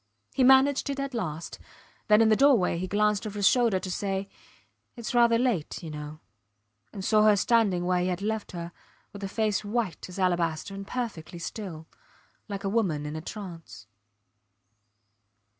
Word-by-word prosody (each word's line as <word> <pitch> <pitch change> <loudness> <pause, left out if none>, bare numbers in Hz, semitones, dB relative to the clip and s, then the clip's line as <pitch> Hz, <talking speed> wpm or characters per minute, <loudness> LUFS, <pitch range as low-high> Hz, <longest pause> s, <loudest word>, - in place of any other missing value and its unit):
He 265 - +2
managed 265 +2 +5
it 275 0 -3
at 275 -1 -3
last; 170 -8 -4 0.5
then 210 0 +6
in 220 - +4
the 215 - +5
doorway 235 -10 +4
he 185 - -3
glanced 210 +1 +1
over 210 0 -7
his 200 -2 +4
shoulder 235 -6 +3
to 185 0 -5
say, 195 +1 -2 0.7
Its 235 -2 -5
rather 235 -1 +5
late 230 -11 -1
you 160 - -6
know 150 +1 -8 0.7
and 190 - -6
saw 215 -1 +4
her 210 -1 +6
standing 200 -4 +2
where 180 0 +1
he 180 - 0
had 180 -1 -1
left 220 -1 -3
her, 170 -1 -6 0.4
with 200 0 -9
a - - -1
face 215 0 0
white 210 -4 -3
as 180 - -9
alabaster 175 -1 0
and 195 0 -7
perfectly 215 -10 -5
still, 170 -2 -6 0.6
like 200 0 -5
a - - -1
woman 190 -9 0
in 150 +1 -5
a 160 - -4
trance. 165 - -9
200 Hz, 175 wpm, -27 LUFS, 175-225 Hz, 0.7 s, then